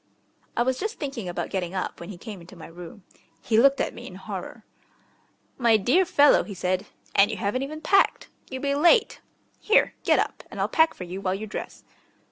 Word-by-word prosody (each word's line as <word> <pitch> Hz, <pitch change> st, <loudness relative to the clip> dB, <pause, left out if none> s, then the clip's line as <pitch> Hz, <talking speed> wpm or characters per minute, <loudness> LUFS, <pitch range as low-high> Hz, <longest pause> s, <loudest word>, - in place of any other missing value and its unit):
I 240 Hz, -, +4 dB
was 260 Hz, +1 st, -1 dB
just 435 Hz, +3 st, -3 dB
thinking 265 Hz, -, -5 dB
about 175 Hz, -, -4 dB
getting 185 Hz, -2 st, -3 dB
up 185 Hz, -, -3 dB
when 170 Hz, -, -9 dB
he 200 Hz, -, -8 dB
came 205 Hz, -1 st, -9 dB
into 175 Hz, +3 st, -14 dB
my 165 Hz, -, -11 dB
room. 175 Hz, +3 st, -11 dB, 0.4 s
He 220 Hz, -1 st, +2 dB
looked 275 Hz, +3 st, +5 dB
at -, -, -1 dB
me -, -, -10 dB
in -, -, -10 dB
horror. -, -, -8 dB, 0.9 s
"My 230 Hz, -3 st, +5 dB
dear 255 Hz, -, +3 dB
fellow!" 290 Hz, -3 st, +5 dB
he 200 Hz, -, -8 dB
said. 185 Hz, +2 st, -1 dB, 0.3 s
"And 200 Hz, +2 st, +5 dB
you 220 Hz, -, -4 dB
haven't 205 Hz, +7 st, -1 dB
even 305 Hz, +3 st, -5 dB
packed! 390 Hz, +5 st, +3 dB, 0.2 s
You'll 260 Hz, 0 st, -6 dB
be 280 Hz, 0 st, +1 dB
late. 345 Hz, +11 st, +3 dB, 0.4 s
Here, 430 Hz, -, +3 dB
get -, -, +4 dB
up, -, -, -1 dB
and -, -, -9 dB
I'll -, -, +1 dB
pack 320 Hz, 0 st, +3 dB
for -, -, -7 dB
you 180 Hz, +2 st, -6 dB
while 185 Hz, -1 st, 0 dB
you 210 Hz, +3 st, -5 dB
dress." 210 Hz, -, -7 dB
220 Hz, 210 wpm, -25 LUFS, 185-280 Hz, 0.9 s, looked